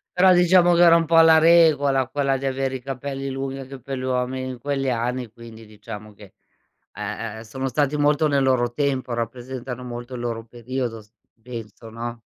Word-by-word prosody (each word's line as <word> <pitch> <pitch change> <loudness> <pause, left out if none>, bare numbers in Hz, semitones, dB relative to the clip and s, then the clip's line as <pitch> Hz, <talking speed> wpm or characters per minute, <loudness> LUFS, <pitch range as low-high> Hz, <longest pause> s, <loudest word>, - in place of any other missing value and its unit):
Però 185 +1 +6
diciamo 175 0 +5
che 170 - +3
era 170 -1 +7
un 165 - 0
po' 165 +1 +6
la 160 0 +7
regola 155 -5 +4
quella 135 -1 0
di 135 - -4
avere 135 0 -1
i 130 - -6
capelli 135 +1 -5
lunghi 135 0 -4
anche 135 0 -9
per 135 +2 -6
gli - - -5
uomini 130 0 -2
in 125 -2 -7
quegli 135 0 -2
anni, 120 0 -2
quindi 115 -1 -13
diciamo 105 0 -10
che, 100 -2 -16 0.6
ehm, 110 -1 -5
sono 130 +4 -5
stati 145 +2 0
molto 150 +1 +2
nel 140 -1 +2
loro 120 -2 +1
tempo, 135 -3 -1
rappresentano 125 +2 -5
molto 120 0 -7
il 125 - -5
loro 115 -1 -4
periodo 120 0 -5
s 105 - -25 0.3
penso, 115 -2 -9
no? 115 +1 -6
130 Hz, 190 wpm, -23 LUFS, 120-140 Hz, 0.6 s, era